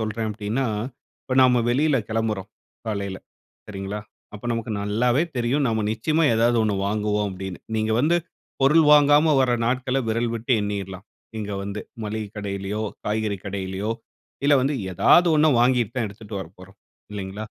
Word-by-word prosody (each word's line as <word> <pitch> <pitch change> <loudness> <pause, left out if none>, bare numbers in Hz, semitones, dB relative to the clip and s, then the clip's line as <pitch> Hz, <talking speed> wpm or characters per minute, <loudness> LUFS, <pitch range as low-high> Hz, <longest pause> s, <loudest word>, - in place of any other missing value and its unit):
சொல்றேன் 110 0 -2
அப்படின்னா? 110 +5 -2 0.6
இப்ப 130 - -3
நாம 125 -2 +4
வெளில 140 +3 +3
கிளம்புறோம் 110 -3 -2 0.4
காலையில 100 -3 -3 0.5
சரிங்களா? 100 0 -5 0.3
அப்ப 105 - -10
நமக்கு 115 -1 -3
நல்லாவே 120 +7 +1
தெரியும் 125 +4 +1
நாம 110 -2 0
நிச்சயமா 155 +8 +1
ஏதாவது 115 +1 +3
ஒண்ணு 105 -2 0
வாங்குவோம், 105 0 0
அப்படின்னு. 95 -1 -6 0.2
நீங்க 110 0 0
வந்து 165 +5 +3 0.5
பொருள் 155 +4 +5
வாங்காம 145 +1 +6
வர 130 -1 +3 0.2
நாட்கள 130 +1 0
விரல் 115 +1 0
விட்டு 115 +3 -1
எண்ணிறலாம். 100 -1 -5 0.3
இங்க 105 -1 -4
வந்து 100 +1 -4 0.2
மளிகை 105 0 -4
கடையிலயோ, 100 +1 -3 0.2
காய்கறி 105 -2 -1
கடையிலயோ 95 +1 -3 0.5
இல்ல 145 - +5
வந்து 140 +2 +1 0.2
ஏதாவது 175 - +5
ஒன்ன 155 +1 +5
வாங்கிட்டு 120 -2 +2
தான் 120 -4 0
எடுத்துட்டு 100 0 -8
வரப்போறோம் 95 +2 -12 0.3
இல்லைங்களா? 100 +1 -5
110 Hz, 145 wpm, -23 LUFS, 100-125 Hz, 0.6 s, வாங்காம